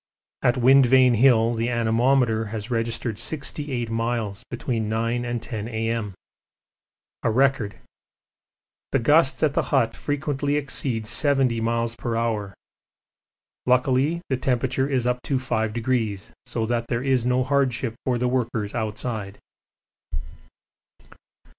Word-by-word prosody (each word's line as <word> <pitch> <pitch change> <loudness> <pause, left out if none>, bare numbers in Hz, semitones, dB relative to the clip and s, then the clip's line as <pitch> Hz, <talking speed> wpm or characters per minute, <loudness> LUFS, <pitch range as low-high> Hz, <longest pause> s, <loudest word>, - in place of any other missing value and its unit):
At 120 +2 +2
Wind 130 +1 +6
Vane 130 0 +5
Hill 120 -1 +4
the 115 +1 -1
anemometer 115 0 +2
has 110 +2 -6
registered 115 -1 -2
68 140 -5 -3
miles 115 -3 -2
between 115 -3 -2
9 115 +2 -1
and 120 -1 -2
10 110 -2 -5
A.M. 115 -3 -2 1.1
a - - +1
record. 125 -3 +2 1.2
The - - +5
gusts 145 +4 +3
at 150 -2 +3
the - - +2
hut 115 -5 +1
frequently 145 -1 -2
exceed 135 -5 -1
70 135 -1 +2
m.p.h. 115 -2 -1 1.2
luckily 130 +6 +2
the 130 - 0
temperature 130 +1 0
is 130 -4 0
up 125 0 0
to 140 - -2
5°, 110 -3 -1 0.2
so 115 -2 -1
that 115 0 -1
there 120 +1 -2
is 130 -3 +2
no 125 +1 +2
hardship 130 -3 0
for 125 -2 0
the 125 +1 0
workers 115 -4 -1
outside. 110 -2 -3
120 Hz, 120 wpm, -24 LUFS, 115-130 Hz, 1.2 s, Wind